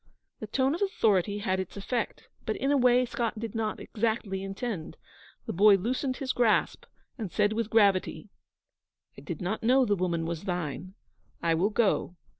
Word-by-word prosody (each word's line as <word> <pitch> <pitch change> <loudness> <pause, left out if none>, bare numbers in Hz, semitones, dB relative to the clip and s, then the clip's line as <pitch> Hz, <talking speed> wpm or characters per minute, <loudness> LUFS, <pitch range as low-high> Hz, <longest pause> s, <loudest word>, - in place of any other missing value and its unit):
The 215 - -6
tone 265 +5 +1
of 340 - -4
authority 205 - +1
had 190 -2 -1
its 190 +1 -5
effect, 230 +4 -3 0.2
but 220 - -2
in 270 +2 0
a - - +4
way 250 -1 +4
Scott 235 -2 -3
did 225 -2 -5
not 220 -2 -2
exactly 220 -3 -2
intend. 195 -2 -5 0.5
The - - -4
boy 205 +3 +6
loosened 255 +6 -1
his 260 -2 -2
grasp, 235 -3 +1 0.3
and 210 -6 -4
said 205 +1 +2
with 225 -1 -2
gravity, 200 -5 +2 0.9
'I - - -11
did 200 - -6
not 195 +5 -2
know 255 +3 +4
the 205 -3 +2
woman 175 -3 -1
was 170 +2 -4
thine. 180 0 -4 0.5
I 165 -1 +3
will 175 +6 +2
go.' 210 -4 +1
215 Hz, 175 wpm, -28 LUFS, 190-235 Hz, 0.9 s, boy